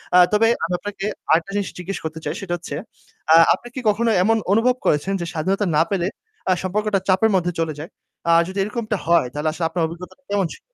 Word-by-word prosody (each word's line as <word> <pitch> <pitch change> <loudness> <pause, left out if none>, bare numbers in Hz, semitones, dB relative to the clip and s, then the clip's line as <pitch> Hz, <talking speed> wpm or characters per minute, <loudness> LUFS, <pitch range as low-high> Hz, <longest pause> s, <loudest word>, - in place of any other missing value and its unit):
আ - - +8 0.2
তবে 225 +2 +4 0.2
আমি 180 - -3
আপনাকে 205 -1 -5 0.3
আরেকটা 170 +4 +2
জিনিস 200 -1 -1
জিজ্ঞেস 180 +1 -4
করতে 160 0 -5
চাই, 150 - -1
সেটা 180 -3 -4
হচ্ছে 170 - -7 0.6
আ - - +9 0.2
আপনি 240 +6 -7
কি - - -3
কখনো 230 +3 +1
এমন 225 +2 +3 0.2
অনুভব 245 +3 +3
করেছেন 155 +7 +1
যে - - -2
স্বাধীনতা 190 +6 0
না - - +5
পেলে 185 -2 0 0.4
আ - - +5
সম্পর্কটা 205 +1 0
চাপের 190 +4 +4
মধ্যে 175 -1 +1
চলে 155 -2 -2
যায়? 170 - -9 0.4
আ - - +6 0.2
যদি 190 +1 -7
এরকমটা 215 0 -3
হয় 170 -7 +4
তাহলে 150 +1 -1
আসলে 165 +1 -3
আপনার 170 0 -1
অভিজ্ঞতা 170 +2 -10
কেমন 200 -3 +1
ছিল? - - -14
190 Hz, 210 wpm, -21 LUFS, 170-210 Hz, 0.6 s, আ